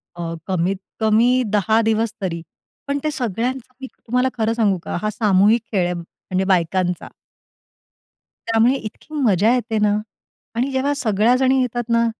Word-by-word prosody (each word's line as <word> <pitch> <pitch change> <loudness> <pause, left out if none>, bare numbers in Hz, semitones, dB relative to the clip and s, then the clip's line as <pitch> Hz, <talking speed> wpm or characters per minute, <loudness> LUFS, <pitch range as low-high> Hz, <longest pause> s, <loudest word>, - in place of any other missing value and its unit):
अ, 165 -1 -4
कमीतकमी 215 +7 +1
10 220 +3 +3
दिवस 225 0 0
तरी. 170 -3 -3 0.5
पण 280 0 0
ते 305 - 0
सगळ्यांचं 250 +1 -3
मी 265 - -5
तुम्हाला 250 +2 0
खरं 225 0 +1
सांगू 215 -5 +2
का? - - -4
हा 215 - 0
सामूहिक 210 +1 +3
खेळ 190 -5 +1
आहे, 180 - -1
म्हणजे 180 +2 -4
बायकांचा 180 +1 -1 1.4
त्यामुळे 230 +3 +4
इतकी 265 +5 -9
मजा 225 - +3
येते 230 -3 -1
ना. 210 0 +2 0.6
आणि 250 +4 0
जेव्हा 270 +2 0
सगळ्याजणी 250 +3 +2
येतात 240 -1 -2
ना. 230 0 +3
225 Hz, 145 wpm, -20 LUFS, 195-250 Hz, 1.4 s, त्यामुळे